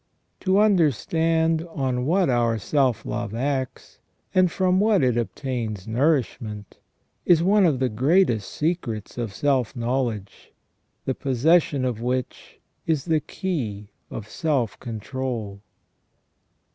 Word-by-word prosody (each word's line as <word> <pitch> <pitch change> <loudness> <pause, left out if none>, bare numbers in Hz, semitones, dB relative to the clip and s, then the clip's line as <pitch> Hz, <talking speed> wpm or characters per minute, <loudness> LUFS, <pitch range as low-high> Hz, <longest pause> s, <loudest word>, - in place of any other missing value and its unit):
To 190 0 +2
understand 165 - +2
on 130 -4 -2
what 180 +2 +3
our 120 -2 +2
self 130 +1 +1
love 115 -2 -3
acts, 130 +1 -3 0.3
and 185 -2 +4
from 185 0 +2
what 205 -5 +3
it 125 -2 +2
obtains 115 -4 -3
nourishment, 115 - -1 0.4
is 170 -2 +4
one 200 0 +4
of 150 -5 +1
the 130 0 +1
greatest 125 - +2
secrets 135 - -3
of 115 -4 -3
self 135 +1 0
knowledge, 120 -4 -3 0.5
the 130 - 0
possession 140 +2 +2
of 120 -3 -2
which 125 +1 -4 0.3
is 155 -4 0
the 160 -2 +2
key 120 - -4 0.2
of 105 - -7
self 135 -4 -1
control. 115 -3 -5
130 Hz, 120 wpm, -24 LUFS, 115-160 Hz, 0.5 s, and